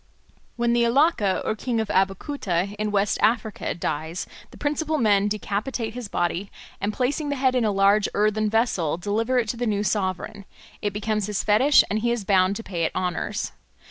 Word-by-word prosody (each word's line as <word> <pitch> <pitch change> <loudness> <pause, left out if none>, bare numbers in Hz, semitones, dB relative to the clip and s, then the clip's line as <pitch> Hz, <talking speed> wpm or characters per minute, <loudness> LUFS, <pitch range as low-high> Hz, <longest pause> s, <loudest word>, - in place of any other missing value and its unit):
When 235 0 +1
the 240 - +3
Alake 235 - +2
or 215 - 0
king 235 +1 -2
of 220 -2 -2
Abeokuta 195 - 0
in 215 0 0
West 205 0 +1
Africa 220 -1 0
dies, 160 +1 -3 0.2
the - - -15
principal 305 +1 -1
men 205 -5 +3
decapitate 215 +3 -3
his 245 -2 -6
body, 175 +1 -2 0.3
and 205 +1 0
placing 280 +6 -1
the 285 - 0
head 260 -1 +2
in 250 -2 +2
a 210 - +2
large 200 +1 +3
earthen 215 +1 +2
vessel 205 -9 +1
deliver 220 +7 0
it 235 -3 +1
to 235 - -2
the 240 0 -1
new 205 -1 0
sovereign; 200 0 -2 0.4
it 205 - -1
becomes 210 0 -2
his 210 -2 -2
fetish 255 +8 +5
and 210 +3 -1
he 235 +2 0
is 235 -4 -1
bound 190 -1 +3
to 225 - -6
pay 175 -6 -3
it - - -1
honours. 180 -1 -2
210 Hz, 190 wpm, -24 LUFS, 195-235 Hz, 0.4 s, fetish